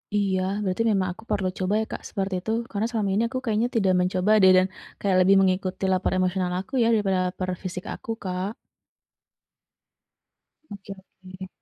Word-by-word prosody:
Iya, 195 -2 +1 0.2
berarti 190 +4 0
memang 190 -3 +1
aku 185 - -15
perlu 195 -3 0
coba 185 +2 0
ya - - -2
Kak - - -5
seperti 195 -1 -3
itu. 220 - -3 0.2
Karena 210 +1 -1
selama 215 -4 -1
ini 215 +4 +2
aku 255 +1 -3
kayaknya 225 +1 +1
tidak 195 -4 +3
mencoba 185 +2 +1
deh, 190 0 +7
dan 185 - +4 0.3
kayak 195 -2 +1
lebih 195 +2 +5
mengikuti 185 0 0
lapar 185 0 +1
emosional 185 0 0
aku 260 +8 -10
ya 230 - +4
daripada 195 -4 +1
lapar 185 0 -5
fisik 180 -1 -6
aku, 230 - -7
Kak. 185 +1 -2 2.2
Oke 200 0 -9
oke. 190 -1 -12
190 Hz, 170 wpm, -25 LUFS, 185-205 Hz, 2.2 s, deh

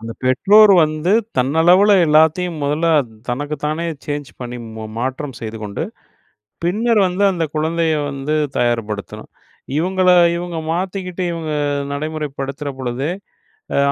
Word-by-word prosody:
அந்த 115 +1 -6
பெற்றோர் 200 +11 +6
வந்து 155 +4 -2 0.3
தன்னளவுல 170 +10 +4
எல்லாத்தையும் 160 +2 +3
முதல்ல 150 +4 0 0.4
தனக்கு 145 +5 -2
தானே 155 +3 -1 0.2
சேஞ்ச் 145 -1 -4
பண்ணி 125 0 -5 0.2
மா 110 - -6
மாற்றம் 130 +2 -3
செய்து 110 0 -6
கொண்டு, 100 -1 -4 0.8
பின்னர் 215 +5 +2
வந்து 185 +3 0
அந்த 170 -2 -1
குழந்தைய 160 +1 0 0.2
வந்து 140 +2 -3 0.2
தயார்படுத்தணும். 115 -4 -2 0.5
இவுங்கள 185 +2 +2 0.3
இவுங்க 175 -1 -4
மாத்திக்கிட்டு 185 0 -3
இவுங்க 160 -2 -4 0.4
நடைமுறைப்படுத்துற 145 -1 -4
பொழுதே. 130 +4 -2 0.7
ஆ - - +1
155 Hz, 115 wpm, -19 LUFS, 135-175 Hz, 0.8 s, பெற்றோர்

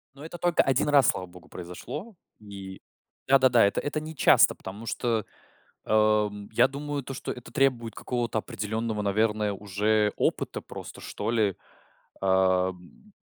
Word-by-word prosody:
Ну 140 - -12
это 165 +2 -8
только 175 0 +3
1 135 +2 +1
раз, 140 -4 +5
слава 90 - -1
богу, 90 -1 -16
произошло. 145 - -8 0.2
И 100 -2 -10 0.5
да-да-да, 130 -4 +5
это 100 - 0
это 155 +1 -2
нечасто, 155 -2 +4
потому 100 +4 -9
что, 115 -3 -1 0.6
ам, 105 -1 +2
я 110 - +4
думаю, 145 0 -4
то, 135 - -6
что - - -5
это 125 - -9
требует 125 -4 +1
какого-то 120 -3 -2
определённого, 110 0 -3
наверное, 105 +1 +1
уже 105 +2 +1
опыта - - -1
просто, - - -10
что 105 +2 -4
ли 105 -5 +1 0.7
ам 95 - 0
110 Hz, 140 wpm, -27 LUFS, 100-135 Hz, 0.7 s, раз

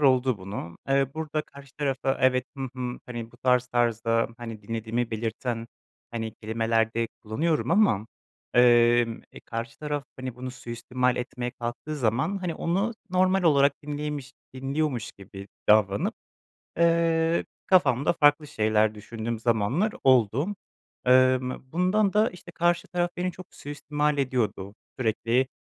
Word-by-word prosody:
oldu 130 -4 +3
bunu, 95 -3 -7
eee, 135 0 +3
burada 155 -1 -2
karşı 140 -1 -15
tarafa 135 -2 0
evet, 130 -1 +3
hı 135 -1 -3
hı, 125 -1 -4
hani, 120 -2 -6
bu 120 - -16
tarz 125 -1 +2
tarzda, 115 -1 +1
hani, 115 -3 -7
dinlediğimi 115 +2 -2
belirten, 115 +1 -3 0.4
hani, 115 -2 -4
kelimeler 115 0 0
de 115 0 0
kullanıyorum 150 +10 0
ama, 165 - +3 0.5
emm, 120 -1 +5
e, - - -11
karşı 115 0 -5
taraf, 150 -2 -3
hani, 130 -2 -5
bunu 130 +1 -6
suistimal 125 +1 -2
etmeye 125 0 -3
kalktığı 120 +5 -5
zaman, 130 - 0
hani, 180 -3 -3
onu 195 +7 0 0.2
normal 185 +1 +3
olarak 140 -3 +5
dinliymiş 145 -1 -4 0.2
dinliyormuş 135 -2 -2
gibi 100 0 -11 0.2
davranıp, 105 -2 +4 0.6
eee, 165 0 +3 0.2
kafamda 150 -7 +4
farklı 150 -1 +4
şeyler 110 -1 +2
düşündüğüm 115 +2 -5
zamanlar 120 - +1
oldu. 130 - +3 0.5
Emm, 130 0 +3
bundan 190 +4 +2
da, 215 +2 +4
işte, 180 -1 -12
karşı 175 0 +1
taraf 175 -1 0
beni 180 0 -1
çok 185 - -11
suistimal 150 0 -2
ediyordu. 115 -7 -1 0.2
Sürekli, 120 +2 +1
130 Hz, 135 wpm, -26 LUFS, 115-150 Hz, 0.6 s, emm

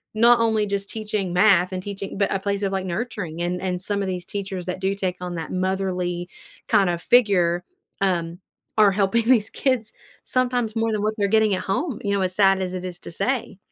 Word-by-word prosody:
not 235 +2 +6
only 220 -2 +2
just 200 0 -2
teaching 210 -4 -3
math 180 -1 +4
and 185 - -3
teaching, 200 -1 -6
but 200 - +1
a - - +1
place 200 +1 -2
of 195 - 0
like, 190 -1 -1
nurturing, 180 -4 -4
and 175 +1 -1
and 180 -1 -2
some 200 +1 -1
of 195 - -3
these 180 -1 -4
teachers 195 -3 -5
that 180 +1 -3
do 190 +1 +1
take 185 -2 -2
on 180 -1 -4
that 165 - -5
motherly 185 -2 -2 0.4
kinda 195 -6 +3
figure, 180 -5 +3 0.4
um, 175 -3 0 0.4
are 210 -2 +6
helping 205 +4 +2
these 230 -3 +3
kids 255 -5 -1 0.3
sometimes 245 -3 0
more 225 0 +1
than 215 -1 -1
what 215 +1 +1
they're 200 - +1
getting 220 -2 +3
at - - -4
home, 245 - -1
you 200 - -1
know, 200 - +1
as 185 0 0
sad 195 -2 +4
as 185 0 -3
it 185 - -5
is 175 -1 -6
to - - -9
say. 235 0 -2
195 Hz, 215 wpm, -23 LUFS, 180-215 Hz, 0.4 s, not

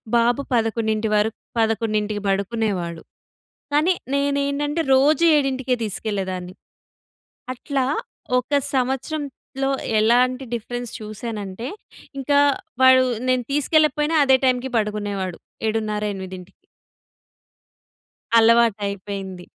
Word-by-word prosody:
బాబు 235 +3 +3
11 220 -1 0
వరకు 210 +1 +1 0.2
11కి 215 -2 0
బడుకునేవాడు, 195 -4 -1 0.7
కానీ 320 +5 +4 0.2
నేనేంటంటే, 280 +2 0
రోజూ 300 +5 +4
ఏడింటికే 265 -2 0
తీసుకెళ్ళేదాన్ని. 190 -4 -3 1.0
అట్లా 270 +1 -2 0.5
ఒక 255 +4 -2 0.2
సంవత్సరంలో 270 +1 -2 0.3
ఎలాంటి 250 +4 +2
డిఫరెన్స్ 245 +1 -5
చూశానంటే, 215 +1 -6 0.5
ఇంకా 285 +2 +3 0.4
వాడు 260 0 +7 0.2
నేను 255 -1 +2
తీసుకెళ్ళకపోయినా 300 +1 +2
అదే 265 0 +5
టైమ్‌కి 255 0 +1
పడుకునేవాడు, 205 -4 -3 0.3
7:30, 215 -1 -1
8కి. 185 -1 -9 1.8
అలవాటయిపోయింది. 200 -5 +1
230 Hz, 80 wpm, -22 LUFS, 210-265 Hz, 1.8 s, వాడు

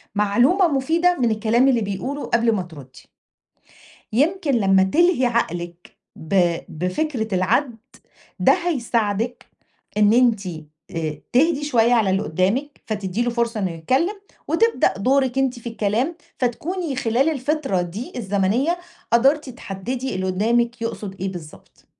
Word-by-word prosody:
معلومة 245 - +3
مُفيدة 330 +5 +1
من 235 -3 +2
الكلام 225 +4 +2
اللي 240 -4 +3
بيقوله 250 +9 -4
قبل 235 0 +2
ما 190 - -1
ترُدّي. 140 -6 -13 1.0
يمكن 315 - +1
لما 195 -6 +4
تلهي 320 - +3
عقلِك 175 -7 -3 0.2
ب 170 0 +1
بفكرة 220 - -2
العَد 225 - +1 0.6
ده - - +5
هيساعدِك 240 - -1 0.5
إن 210 0 +5
أنتِ 230 -5 +3
آآ 155 -1 -7
تهدِي 295 +3 +3
شوية 245 -4 +3
على 220 -5 +3
اللي 195 +1 +1
قُدّامِك 200 - -1
فتدّي 205 0 -3
له 240 - 0
فرصة 235 -2 -1
إنه 185 -3 -1
يتكلّم 270 - -1 0.3
وتبدأ 370 - +2
دورِك 265 +3 +1
أنتِ 260 -3 0
في 235 - -6
الكلام، 230 +9 -1 0.2
فتكوني 300 +5 -2
خلال 250 +4 +1
الفترة 280 - -1
دي 190 +8 -6
الزمنيّة 225 - 0 0.3
قَدَرتِ 270 +4 +3
تحدّدي 245 +3 -5
اللي 185 0 -2
قُدّامِك 230 +5 0
يقصُد 205 -4 -5
إيه 190 0 -2
بالضبط، 160 -4 -12
235 Hz, 130 wpm, -22 LUFS, 195-270 Hz, 1.0 s, ده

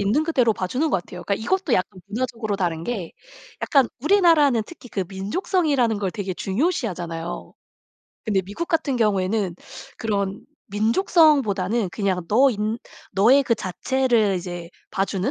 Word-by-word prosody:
있는 215 +10 +2
그대로 255 -8 +3
봐주는 250 +11 -1
것 - - +3
같아요. 180 0 -10
그러니까 200 - 0
이것도 345 - -1
약간 185 +1 -2
문화적으로 230 -1 -3
다른 170 -4 -1
게 200 -9 -4 0.5
약간 270 -5 +3
우리나라는 305 - +4
특히 330 -7 -13
그 195 -4 -2
민족성이라는 245 - 0
걸 195 -3 -1
되게 195 -3 -4
중요시하잖아요. 190 - -3 0.7
근데 200 -4 +1
미국 205 - -5
같은 315 -6 0
경우에는 200 -3 +1 0.4
그런 200 -3 -2 0.2
민족성보다는 225 - +2
그냥 190 -3 -1
너인 220 -2 +2 0.3
너의 240 +8 +5
그 245 -3 +1
자체를 225 +2 +1
이제 175 -1 -6 0.2
봐주는 195 +3 -1
215 Hz, 345 characters per minute, -23 LUFS, 190-265 Hz, 0.7 s, 너의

